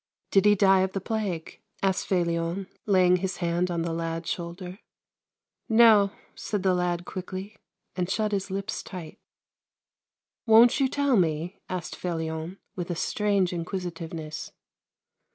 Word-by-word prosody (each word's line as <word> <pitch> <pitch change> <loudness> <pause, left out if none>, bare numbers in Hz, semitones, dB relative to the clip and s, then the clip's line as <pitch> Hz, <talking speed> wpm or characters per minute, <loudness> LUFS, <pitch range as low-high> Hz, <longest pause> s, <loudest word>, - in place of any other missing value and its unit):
" - - -56
Did 195 0 +4
he 210 0 +6
die 195 -1 +5
of 190 0 0
the 195 - -1
plague? 195 -5 -4
" - - -21
asked 190 -1 +1
Felion, 170 +1 0 0.2
laying 185 -2 +5
his 190 +1 -3
hand 175 +1 0
on 170 -1 -1
the 165 -1 -2
lad's 165 0 -3
shoulder. 180 +2 -6 0.5
" - - -63
No," 220 -3 +7 0.2
said 205 -3 -3
the 190 -1 +3
lad 175 -1 -1
quickly, 190 +3 -6 0.4
and 180 -1 -1
shut 215 +1 0
his 200 -1 -1
lips 195 +2 -3
tight. 175 -5 -9 0.7
" - - -67
Won't 230 +4 +7
you 270 - +4
tell 280 -2 +2
me? 165 0 0
" - - -41
asked 180 -3 -4
Felion, 160 0 -4 0.2
with 175 -1 -4
a 175 - -1
strange 200 0 +1
inquisitiveness. 165 -3 -5
185 Hz, 155 wpm, -27 LUFS, 170-200 Hz, 0.7 s, No